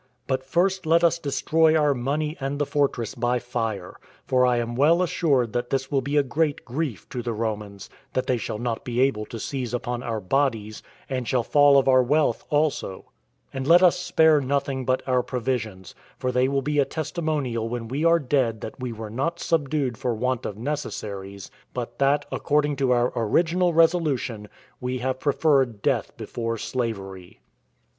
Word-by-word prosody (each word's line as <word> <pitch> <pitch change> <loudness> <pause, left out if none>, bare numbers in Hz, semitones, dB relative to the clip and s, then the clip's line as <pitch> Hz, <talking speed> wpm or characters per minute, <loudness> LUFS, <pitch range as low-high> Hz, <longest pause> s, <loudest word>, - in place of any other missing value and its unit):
But 130 -1 -1
first 175 +6 0
let 165 +2 +4
us 170 0 +3
destroy 160 +2 +2
our 150 -2 +3
money 145 +5 -2
and 135 +1 -3
the 145 - 0
fortress 140 -6 0
by 120 0 0
fire; 115 -6 -4 0.3
for 125 -1 +3
I 125 -1 +2
am 120 0 -2
well 160 +7 +4
assured 140 -10 +1
that 120 0 -2
this 135 0 -2
will 135 -2 +2
be 140 +3 -1
a 145 - +5
great 145 +3 -1
grief 130 - -4
to 125 - -4
the 120 -1 -3
Romans, 105 -3 -4 0.3
that 130 - 0
they 125 - +1
shall 110 - -4
not 120 0 -3
be 120 -1 -3
able 115 -5 +1
to 115 - -7
seize 125 -1 -3
upon 120 0 -3
our 115 -3 -3
bodies, 110 -1 -1 0.3
and 130 -3 -3
shall 125 -2 +1
fail 145 +2 +5
of 135 - +3
our 130 -1 +6
wealth 145 +5 +1
also; 145 -10 -1 0.4
and 135 0 -4
let 175 +3 +7
us 180 - +5
spare 160 -2 +4
nothing 135 -1 -1
but 130 +1 0
our 125 -1 +3
provisions; 115 -7 -3 0.2
for 130 - -1
they 125 +1 +2
will 135 0 0
be 150 +2 0
a - - +6
testimonial 145 -8 -2
when 120 -1 -4
we 135 +6 -2
are 170 0 +5
dead 125 -7 0
that 110 - -7
we 125 -1 -4
were 110 -1 -7
not 155 +9 -2
subdued 140 -6 0
for 120 -2 -1
want 125 +2 -1
of 105 - -7
necessaries, 100 -8 -5 0.2
but - - -5
that, 140 +1 +2
according 145 0 +1
to 135 -1 0
our 120 0 +2
original 170 - +2
resolution, 155 -10 +1 0.3
we 125 +1 -2
have 130 +1 -2
preferred 135 -7 +1
death - - 0
before 115 -1 -4
slavery." 95 -7 -5
130 Hz, 180 wpm, -24 LUFS, 115-145 Hz, 0.4 s, let